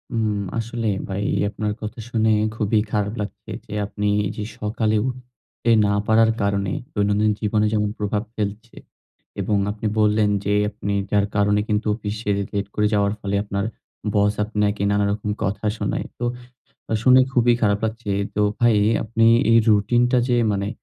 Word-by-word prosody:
উম 110 -2 +1 0.3
আসলেই 115 -2 -2
ভাই 100 +1 -2 0.3
আপনার 105 -1 -3
কথা 110 +2 -6
শুনে 110 -2 +2 0.2
খুবই 105 0 +1
খারাপ 105 0 0
লাগছে 100 - -7
যে - - -9
আপনি 105 0 -3 0.3
যে 105 - -4 0.2
সকালে 110 0 0
উঠতে 125 -2 -7 0.2
না 100 - +2
পারার 110 0 +5
কারণে 100 -1 0 0.2
দৈনন্দিন 105 +1 +2
জীবনে 105 0 +1
যেমন 105 -1 +1
প্রভাব 105 +1 -1
ফেলছে 105 +2 -5 0.6
এবং 100 +2 0
আপনি 110 +1 -4
বললেন 105 0 +3 0.2
যে 105 - +1 0.2
আপনি 100 -1 -4 0.2
যার 100 -1 +3
কারণে 105 0 +3
কিন্তু 105 0 0
অফিসে 105 -1 -5 0.2
লেট 100 0 -1
করে 105 0 +2
যাওয়ার 100 0 +2
ফলে 100 0 -2
আপনার 100 0 -2 0.5
বস 105 0 +3
আপনাকে 105 -1 -1
নানা 100 0 +2
রকম 105 0 -3
কথা 100 +2 -2
শোনায়। - - -2
তো 120 - -1 0.8
শুনে 130 +1 +7
খুবই 120 -1 +4
খারাপ 100 -1 +3
লাগছে। 110 -1 -3 0.2
তো 105 - 0 0.2
ভাই 120 -2 +5 0.3
আপনি 115 +1 +2 0.2
এই 115 - +7
রুটিন 105 +3 +3
টা 125 - +3
যে 125 - +2 0.2
মানে 100 0 -2
105 Hz, 160 wpm, -22 LUFS, 100-110 Hz, 0.8 s, শুনে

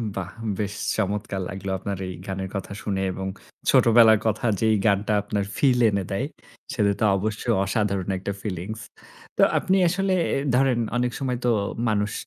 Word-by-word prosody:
বাহ! 90 -2 -4 0.3
বেশ 105 -1 -2 0.2
চমৎকার 100 -1 -2
লাগলো 95 0 -5
আপনার 100 +1 -4
এই 90 - -5
গানের 95 0 -4
কথা 100 0 -4
শুনে 95 -2 -1
এবং 95 +1 -4 0.4
ছোটবেলার 115 -2 +6
কথা 110 +2 0
যেই 110 -1 +3
গানটা 105 0 +2
আপনার 105 0 -2
ফিল 130 -3 +3
এনে 100 -2 -1
দেয়, 100 +7 -1 0.5
সেটা 105 -4 +2
তো - - 0
অবশ্যই 110 +4 -1
অসাধারণ 100 -1 -1
একটা 95 +2 -4
ফিলিংস। 105 +2 -5 0.6
তো - - +3 0.2
আপনি 190 -1 +1
আসলে 190 +2 +1 0.2
এ - - +1 0.2
ধরেন 130 -2 +3 0.2
অনেক 125 0 0
সময় 130 -2 -1
তো - - +3 0.4
মানুষ 105 0 0
105 Hz, 160 wpm, -24 LUFS, 100-115 Hz, 0.6 s, ছোটবেলার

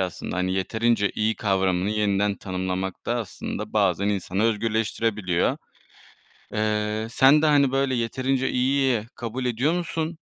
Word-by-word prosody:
aslında. 90 0 -3
Hani, 90 0 0
yeterince 105 +2 +1
iyi 110 +1 0
kavramını 95 -1 +1
yeniden 105 -1 +1
tanımlamak 95 0 -4
da 120 - 0
aslında 110 -6 -5
bazen 100 -2 +2
insanı 100 0 -1
özgürleştirebiliyor. 110 -4 0 1.0
Eee, 105 0 -1
sen 135 +5 +5
de, - - +4
hani, 140 -3 +4
böyle, 135 -1 +1
yeterince 130 +3 0
iyiyi 130 -2 +1
kabul 120 +2 -4
ediyor 125 +6 +1
musun? 165 -1 -3
110 Hz, 130 wpm, -24 LUFS, 100-130 Hz, 1.0 s, sen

